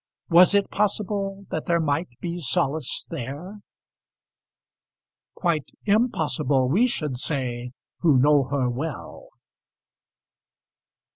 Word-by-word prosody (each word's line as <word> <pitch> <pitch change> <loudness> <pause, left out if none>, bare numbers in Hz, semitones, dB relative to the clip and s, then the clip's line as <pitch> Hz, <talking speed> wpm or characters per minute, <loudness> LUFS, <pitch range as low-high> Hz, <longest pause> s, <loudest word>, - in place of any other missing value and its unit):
Was 180 +4 +7
it 200 -1 +2
possible 200 -1 -1
that 155 - -3
there 170 -1 +2
might 155 +2 0
be 175 0 -4
solace 160 0 -1
there? 165 - -6 1.8
Quite 165 -5 -1 0.2
impossible, 155 - +1
we 210 - +4
should 150 - -2
say, 125 -3 -2 0.3
who 155 -6 +4
know 145 +1 +4
her 135 -1 0
well. 130 +3 -5
160 Hz, 95 wpm, -24 LUFS, 135-195 Hz, 1.8 s, Was